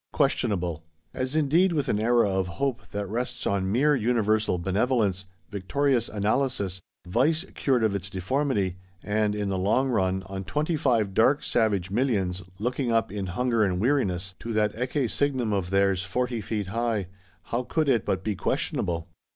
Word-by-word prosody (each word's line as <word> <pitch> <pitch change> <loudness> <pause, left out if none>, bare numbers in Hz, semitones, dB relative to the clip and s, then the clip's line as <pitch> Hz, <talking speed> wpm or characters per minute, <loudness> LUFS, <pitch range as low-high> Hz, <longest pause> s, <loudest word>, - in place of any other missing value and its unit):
Questionable! 85 -5 0 0.3
As 130 +3 -2
indeed, 160 +5 +3
with 145 -4 0
an 105 - +1
Era 120 0 +3
of 95 -1 0
Hope 135 -4 -2
that 100 0 -3
rests 125 +4 -3
on 95 -1 0
mere 145 +7 +3
universal 110 -4 +1
Benevolence, 100 +1 0 0.2
victorious 120 +5 0
Analysis, 105 -3 -1 0.3
Vice 150 - +2
cured 130 -4 +1
of 110 -2 +2
its 100 -1 -3
deformity; 100 -1 -1 0.3
and, 105 0 0
in 105 -1 -2
the 95 -1 -1
long 120 +8 +2
run, 95 -5 +1
on 95 0 -5
Twenty 150 - -1
five 115 -9 +1
dark 135 +8 +3
savage 100 -6 +1
Millions, 100 -6 0 0.2
looking 125 +4 -1
up, 115 -4 +1
in 100 -2 -3
hunger 115 +4 +1
and 90 -3 0
weariness, 100 -7 0
to 115 - -5
that 105 -1 +2
Ecce 125 +1 -1
signum 130 -6 0
of 95 -3 -1
theirs 100 -1 +2
"forty 120 +4 -2
feet 105 -1 -3
high,"—how 100 -1 -3
could 155 +2 0
it 120 -6 +3
but 95 -1 -1
be 105 - 0
questionable? 85 -2 -1
110 Hz, 160 wpm, -26 LUFS, 95-125 Hz, 0.3 s, indeed